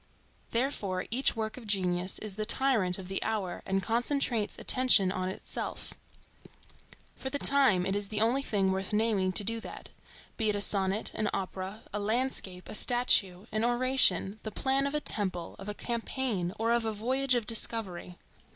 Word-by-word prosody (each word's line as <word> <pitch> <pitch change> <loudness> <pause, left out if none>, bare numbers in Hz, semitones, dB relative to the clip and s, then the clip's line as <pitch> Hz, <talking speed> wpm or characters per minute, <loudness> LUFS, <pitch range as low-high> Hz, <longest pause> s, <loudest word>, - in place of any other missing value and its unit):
Therefore 210 -7 -1
each 255 +3 +2
work 220 0 -3
of 235 -4 -10
genius 185 -2 0
is 215 -3 -6
the 215 - -3
tyrant 220 -6 +1
of 190 -2 -8
the 195 +1 -1
hour 210 -5 -2
and 195 0 0
concentrates 235 -1 0
attention 250 -7 +4
on 185 -1 -2
itself. 190 - -5 1.2
For 265 - -4
the 285 - -1
time, 270 -11 +4
it 195 - -1
is 205 0 -1
the 215 +1 -2
only 235 +5 +2
thing 200 -7 0
worth 190 +2 -3
naming 210 -3 +1
to 205 - +6
do 230 +2 -1
that,—be 220 -1 -7
it 210 - +1
a - - -1
sonnet, 200 0 +2
an 215 -1 -1
opera, 190 +2 -5
a 210 - -2
landscape, 205 -4 -2
a - - -7
statue, 210 -5 +2
an 215 +1 -1
oration, 240 -5 +3
the 215 - -5
plan 270 +5 0
of 280 - -3
a - - +2
temple, 185 -9 -1
of 195 +2 -7
a 205 - -4
campaign, 235 -6 -2
or 230 +1 0
of 235 0 +2
a 220 - -1
voyage 255 +5 +1
of 235 -3 0
discovery. 210 -6 -3
215 Hz, 175 wpm, -30 LUFS, 190-240 Hz, 1.2 s, to